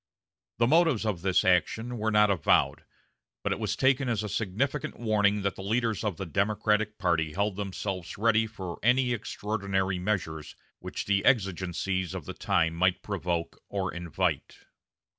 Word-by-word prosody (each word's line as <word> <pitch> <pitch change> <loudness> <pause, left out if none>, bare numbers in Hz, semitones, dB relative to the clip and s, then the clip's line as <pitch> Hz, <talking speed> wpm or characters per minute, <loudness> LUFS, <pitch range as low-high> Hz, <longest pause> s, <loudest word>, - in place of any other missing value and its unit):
The 115 - +3
motives 155 -4 +3
of 100 -6 -1
this 95 0 +2
action 110 +7 +1
were 110 +1 0
not 105 -1 +4
avowed, 85 -7 +2 0.6
but - - 0
it - - -1
was - - -1
taken 130 0 +2
as 110 -3 0
a 105 - -4
significant 115 +9 -2
warning 105 -3 +2
that 100 -1 -1
the - - -8
leaders 115 +2 0
of 105 -6 -2
the 95 - -4
Democratic 105 +4 0
party 80 -4 0
held 100 +2 0
themselves 95 -3 -4
ready 110 +1 +3
for 95 -5 -7
any 125 +1 +3
extraordinary 100 -4 -2
measures 85 -6 -3 0.2
which - - -5
the 100 -1 +1
exigencies 95 - 0
of 90 -6 -6
the - - -6
time 80 -1 +1
might 90 +2 +1
provoke 90 -4 -3
or 95 -2 -2
invite. 85 -3 -3
100 Hz, 160 wpm, -28 LUFS, 90-110 Hz, 0.6 s, not